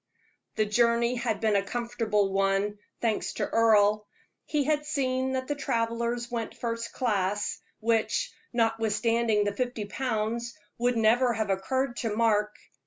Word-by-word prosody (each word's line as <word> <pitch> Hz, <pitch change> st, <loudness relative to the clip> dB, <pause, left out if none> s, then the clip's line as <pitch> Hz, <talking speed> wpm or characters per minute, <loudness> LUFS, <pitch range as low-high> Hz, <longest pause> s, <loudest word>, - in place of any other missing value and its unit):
The 215 Hz, -, +2 dB
journey 235 Hz, +2 st, +2 dB
had 235 Hz, -3 st, -1 dB
been 215 Hz, -2 st, +2 dB
a 200 Hz, -, +4 dB
comfortable 215 Hz, -3 st, -1 dB
one, 195 Hz, +1 st, +1 dB, 0.2 s
thanks 225 Hz, -3 st, 0 dB
to -, -, -2 dB
Earle. 215 Hz, -2 st, +3 dB, 0.4 s
He 295 Hz, -2 st, 0 dB
had 300 Hz, +1 st, +1 dB
seen 260 Hz, -3 st, -1 dB
that 260 Hz, 0 st, -2 dB
the 290 Hz, -, 0 dB
travelers 235 Hz, -2 st, -1 dB
went 230 Hz, -2 st, -4 dB
first 230 Hz, -1 st, -3 dB
class, 205 Hz, -4 st, -1 dB, 0.2 s
which, 230 Hz, -, +1 dB, 0.2 s
notwithstanding 225 Hz, -1 st, +1 dB
the 205 Hz, 0 st, -1 dB
fifty 245 Hz, -2 st, -2 dB
pounds, 235 Hz, +1 st, -2 dB, 0.2 s
would 245 Hz, 0 st, +1 dB
never 235 Hz, +3 st, +4 dB
have 220 Hz, -2 st, -1 dB
occurred 240 Hz, +6 st, -1 dB
to 225 Hz, -3 st, -2 dB
Mark. 210 Hz, -2 st, +2 dB
230 Hz, 140 wpm, -28 LUFS, 210-245 Hz, 0.4 s, a